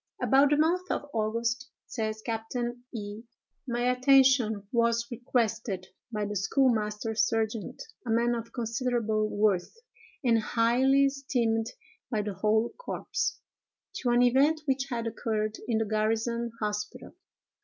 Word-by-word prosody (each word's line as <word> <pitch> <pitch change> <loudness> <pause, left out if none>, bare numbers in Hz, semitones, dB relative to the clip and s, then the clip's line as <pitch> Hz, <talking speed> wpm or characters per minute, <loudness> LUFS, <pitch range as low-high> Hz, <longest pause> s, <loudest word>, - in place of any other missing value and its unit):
"About 275 +1 +4
the 295 - +3
month 350 +4 +1
of - - -1
August," 230 +4 -1 0.2
says 215 -2 -4
Captain 240 +2 -3
E——, 210 -2 -6 0.5
"my 240 -1 -1
attention 255 -4 +4
was 235 -1 +2
requested 230 -5 -1 0.3
by 210 -2 -2
the 205 0 -4
schoolmaster 220 0 +1
sergeant, 220 0 -1 0.2
a 245 - -7
man 235 +2 +2
of 230 -1 -5
considerable 230 -2 -1
worth, 205 - +1 0.5
and 230 -3 +4
highly 250 +5 +3
esteemed 245 -5 0 0.4
by 215 -4 0
the 205 -1 -3
whole 220 +4 +2
corps, - - -2 0.6
to 250 - -1
an 240 +1 +4
event 280 +6 +4
which 270 -1 0
had 235 -2 -2
occurred 215 -1 -2
in 230 -3 +1
the 225 - +1
garrison 225 +2 0
hospital. 210 -1 -4
230 Hz, 130 wpm, -28 LUFS, 215-250 Hz, 0.6 s, About